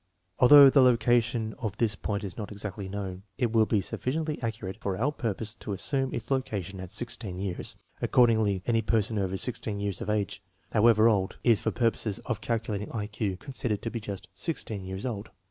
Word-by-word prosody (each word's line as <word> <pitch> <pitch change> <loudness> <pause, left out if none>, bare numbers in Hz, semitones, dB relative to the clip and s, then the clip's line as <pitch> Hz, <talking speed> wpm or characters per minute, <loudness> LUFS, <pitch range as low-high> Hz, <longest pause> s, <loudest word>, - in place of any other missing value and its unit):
Although 140 +2 +9
the 140 - +6
location 120 -2 +3
of 105 -3 -4
this 110 -3 +2
point 100 +1 -3
is 95 -3 -5
not 105 -2 -6
exactly 100 -1 -5
known, 95 -2 -5 0.2
it 120 -3 +1
will 110 -1 +4
be 105 - +2
sufficiently 150 - -2
accurate 110 -5 -4
for 95 -2 -2
our 135 +6 +1
purpose 110 -5 -3
to 105 - -4
assume 135 +7 -1
its 115 +3 -5
location 100 -8 -2
at 95 -1 -7
16 115 -6 -4
years. 95 -2 -4 0.3
Accordingly, 110 -6 +3
any 115 -1 +2
person 110 -1 +1
over 95 -1 -1
16 110 -2 -3
years 100 -2 -3
of - - -4
age, 105 -1 -1 0.3
however 110 0 +5
old, 100 -4 +1
is 115 -3 +4
for - - +1
purposes 115 -3 0
of 115 -4 -2
calculating 110 -3 -2
INSTRUCTIONS 105 -1 -5
FOR - - -3
USING 100 - +1
Ul - - -5
I - - -13
Q - - -20
considered 125 -6 -2
to 115 - -3
be 115 - -3
just 100 -4 -6
16 105 - -2
years 95 +3 -5
old. 110 -4 -4
110 Hz, 205 wpm, -28 LUFS, 100-120 Hz, 0.3 s, Although